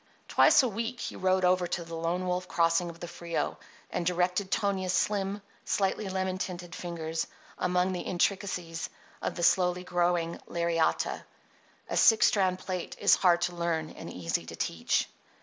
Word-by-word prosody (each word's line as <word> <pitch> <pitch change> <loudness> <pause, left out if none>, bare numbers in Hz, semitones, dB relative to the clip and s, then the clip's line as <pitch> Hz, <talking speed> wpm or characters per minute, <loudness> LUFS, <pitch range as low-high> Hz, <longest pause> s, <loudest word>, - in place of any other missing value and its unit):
Twice - - +6
a - - +2
week 230 +2 -3
he - - -5
rode 185 0 +2
over 180 0 +3
to 170 - -2
the 165 0 -10
Lone 165 +3 -1
Wolf 180 0 -1
Crossing 170 0 +2
of 170 0 -10
the 175 - -6
Frio, 170 -1 -3 0.3
and - - -1
directed 180 +2 +1
Tonia's 190 -3 0
slim, 200 0 0 0.2
slightly 195 +1 0
lemon 185 0 -2
tinted 175 -2 -5
fingers 165 -2 -3 0.3
among 180 +1 +1
the 180 - -3
intricacies 180 -3 -1 0.3
of - - -2
the 175 - -3
slowly 180 0 +3
growing 175 -1 0
lariata. 170 -1 0 0.6
A - - -3
six 225 - +6
strand 190 -5 +3
plait 185 -1 -5
is - - +5
hard 175 -2 +4
to 175 - -1
learn 165 -2 -1
and - - -9
easy 85 -1 -2
to - - -7
teach. - - 0
180 Hz, 165 wpm, -29 LUFS, 170-190 Hz, 0.6 s, Twice